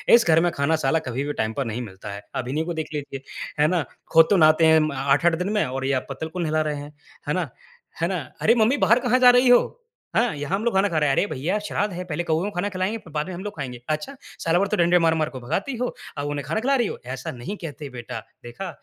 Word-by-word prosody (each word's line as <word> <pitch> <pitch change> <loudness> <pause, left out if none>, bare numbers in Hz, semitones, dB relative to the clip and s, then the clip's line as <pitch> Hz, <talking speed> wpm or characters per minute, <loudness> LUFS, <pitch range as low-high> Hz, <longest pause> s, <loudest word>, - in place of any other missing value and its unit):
इस 235 - +4
घर 160 -1 +6
में 175 - +1
खाना 140 +3 +1
साला 160 +5 +3
कभी 130 +3 -2
भी 145 - -3
टाइम 110 +1 -1
पर 135 +1 -2
नहीं 115 +2 -3
मिलता 95 -3 -8
है 100 - -7 0.2
अभिनव 150 +6 -2
को 175 - -3
देख 160 -1 -3
लीजिए," 140 -2 -5 0.4
है 150 - +5
ना? 170 -2 +1 0.3
"खुद 165 0 +7
तो 200 - +4
नहाते 155 0 +5
हैं 160 0 +6
अम, 155 -1 +2
8-8 140 +5 +2
दिन 180 +4 -2
में 210 - +2
और 130 +1 -3
ये 140 - +1
आप 130 - -1
पत्तल 160 - -4
को 180 - -6
नहला 155 -2 +1
रहे 150 - -2
हैं," 145 +1 -8 0.3
है 150 - +1
ना 175 -4 -1 0.5
है 170 - +2
ना? 190 - -1 0.3
"अरे! 230 - +5
मम्मी 235 +4 +3
बाहर 230 -2 +4
कहाँ 250 0 +2
जा 250 -1 +8
रही 255 - +4
हो? 245 - +4 0.3
हाँ, 230 -5 +2
यहाँ 145 +6 -2
हम 215 - -5
लोग 235 - +1
खाना 195 +1 +3
खा 165 - -1
रहे 150 -2 +2
हैं। 135 - +2
अरे - - +2
भइया! 155 +7 -1
श्राद्ध 205 -1 -2
है 180 - -4
पहले 160 +3 -2
कउओं 160 +1 0
को 205 - -3
खाना 180 +3 -1
खिलाएँगे 190 +3 -2
फिर 180 -7 -15
बाद 150 +1 -1
में 185 - -6
हम 180 +3 -6
लोग 205 - -6
खाएँगे। 125 -4 -6
अच्छा! 155 - -2 0.2
साल 165 +1 +2
भर 200 +2 +2
तो - - +2
डंडे 175 0 +4
मार-मार 160 -1 +2
कर 130 - -8
भगाती 160 - -2
हो 250 +1 -1 0.3
अब 145 0 -2
उन्हें 145 -2 -3
खाना 165 +9 0
खिला 275 +4 +2
रही 240 -5 +2
हो। - - -5 0.2
ऐसा 125 - -6
नहीं 130 +12 -6
कहते 150 -2 -6
बेटा 115 -1 -6 0.2
देखा 120 +11 -6
160 Hz, 280 wpm, -24 LUFS, 145-195 Hz, 0.5 s, जा